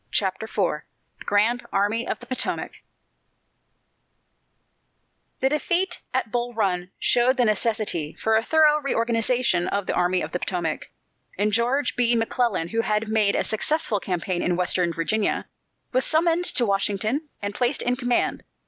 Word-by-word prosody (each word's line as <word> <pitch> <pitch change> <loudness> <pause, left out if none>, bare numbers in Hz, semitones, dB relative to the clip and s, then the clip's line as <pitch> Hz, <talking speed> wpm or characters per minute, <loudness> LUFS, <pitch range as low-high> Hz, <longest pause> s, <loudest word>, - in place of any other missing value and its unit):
CHAPTER 190 +2 0
IV 185 -8 -1 0.4
THE - - -11
GRAND 225 +5 +2
ARMY 205 +4 0
OF - - -2
THE 245 - -12
POTOMAC 255 +1 -3 2.6
The 265 - +3
defeat 350 +5 0
at 255 -4 -1
Bull 240 -1 -2
Run 180 -4 0
showed 245 +2 +3
the 245 - +3
necessity 215 -7 0
for 220 0 +2
a 220 - +4
thorough 305 +3 +4
reorganization 230 -7 +1
of 200 -1 -1
the - - -1
Army 180 +1 +1
of - - -5
the 180 - -2
Potomac, 175 -5 -3 0.5
and 210 +2 +1
George 245 +5 +1
B. 240 -1 +3
McClellan, 225 -6 0
who 225 +3 0
had 215 0 -1
made 215 -2 +2
a - - +1
successful 220 -1 0
campaign 180 -1 -2
in 180 - +1
Western 180 -1 +1
Virginia, 185 +6 -1 0.5
was 255 +1 +2
summoned 335 +2 +2
to 245 - +1
Washington 210 +8 -1
and 205 0 -4
placed 245 +5 0
in 245 +1 +1
command. 245 -1 0
220 Hz, 150 wpm, -24 LUFS, 195-250 Hz, 2.6 s, a